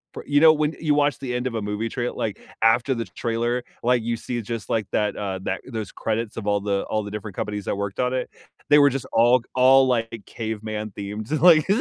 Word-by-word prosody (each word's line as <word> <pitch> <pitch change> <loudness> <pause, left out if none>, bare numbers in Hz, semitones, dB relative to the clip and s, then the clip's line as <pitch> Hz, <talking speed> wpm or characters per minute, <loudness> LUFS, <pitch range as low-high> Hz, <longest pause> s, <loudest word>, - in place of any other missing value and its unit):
p - - -5
you 145 +1 +2
know, 160 -1 +9
when 155 0 0
you 150 -2 +1
watch 145 0 +2
the 130 -3 -4
end 125 +1 -1
of 115 - -4
a 110 - -1
movie 105 +2 -2
trail 120 -2 -3
like, 105 -2 -3 0.2
after 115 +4 +3
the 115 -2 -3
t - - -20
trailer, 120 +1 -1 0.2
like, 120 -1 +2
you 115 0 -1
see 120 0 -4
just, 115 0 -6
like, 110 -4 0
that, 105 -1 0
uh, 95 -2 -3
that - - -2
those 110 -5 -5
credits 115 0 -3
of 105 -2 -5
all 100 0 +2
the 100 -1 -1
all 110 -1 0
the 100 - -7
different 105 -2 -6
companies 105 -2 -4
that - - -1
worked 100 -1 -4
on 125 0 +1
it. 130 - -2 0.4
They 145 0 +7
were 145 0 +6
just 135 -2 -4
all 120 +2 +4
all 130 +1 +6
like 115 -3 -1
caveman 110 -1 -5
themes. 105 +2 -6
Like 155 0 +6
115 Hz, 240 wpm, -23 LUFS, 105-130 Hz, 0.4 s, know